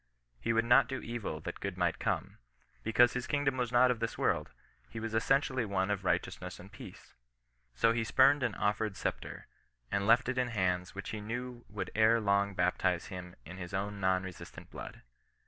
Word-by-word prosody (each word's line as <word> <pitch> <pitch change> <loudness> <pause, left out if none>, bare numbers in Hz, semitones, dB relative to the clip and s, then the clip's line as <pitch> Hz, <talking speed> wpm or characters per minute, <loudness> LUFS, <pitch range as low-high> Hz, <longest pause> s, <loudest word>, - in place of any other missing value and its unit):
He 65 - -1
would 115 0 +2
not 120 +1 +6
do 130 - -3
evil 115 -10 -5
that - - -6
good 100 -2 -4
might 90 -3 0
come: - - -2 0.2
— - - -35
because 120 +2 +4
his 125 0 -3
kingdom 145 -3 +1
was 125 -2 -1
not 125 +1 +5
of 120 - -2
this 115 +1 -3
world, - - 0 0.4
but 115 - -5
was 110 0 -4
essentially 130 +2 +2
one 100 -2 0
of 100 -1 -2
right 95 - +3
eousness - - -8
and - - -12
peace. - - -12 0.6
So 115 - +4
he 115 0 0
spurned 135 +5 +5
an 120 -4 0
offered 105 0 -1
sceptre, - - -4 0.5
and 100 0 0
left 120 +3 +5
it 130 0 0
in 125 - +1
hands 90 -5 -1
which 100 - -5
he 110 - -5
knew 120 +3 -5
would 105 -1 -5
ere 110 +1 +4
long 100 -1 +1
bap 90 0 +1
tize 90 -2 0
him 90 -1 -8
in 90 +5 -9
his 90 0 -6
own 100 +1 -3
non 95 -1 +2
resistant 95 -2 -10
blood. - - -9
110 Hz, 205 wpm, -32 LUFS, 95-120 Hz, 0.6 s, not